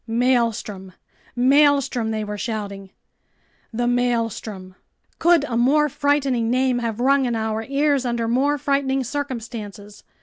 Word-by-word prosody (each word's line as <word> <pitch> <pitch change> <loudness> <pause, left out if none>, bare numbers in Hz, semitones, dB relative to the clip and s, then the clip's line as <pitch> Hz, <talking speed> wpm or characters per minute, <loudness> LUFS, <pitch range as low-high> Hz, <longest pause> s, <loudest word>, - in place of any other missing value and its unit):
"Maelstrom! 230 -5 0 0.4
Maelstrom!" 270 -2 +3
they 215 -1 -2
were 210 0 -5
shouting. 205 -3 -5 0.8
The 240 +1 -2
Maelstrom! 230 -6 -2 0.5
Could 340 -2 +4
a 250 -5 -3
more 290 +6 +3
frightening 275 -5 0
name 255 0 +1
have 230 -2 -3
rung 270 +2 +3
in 240 -2 -1
our 220 0 -2
ears 280 +1 +1
under 235 -2 -1
more 275 +5 +1
frightening 270 -1 0
circumstances? 230 -6 -6
245 Hz, 125 wpm, -22 LUFS, 220-275 Hz, 0.8 s, Could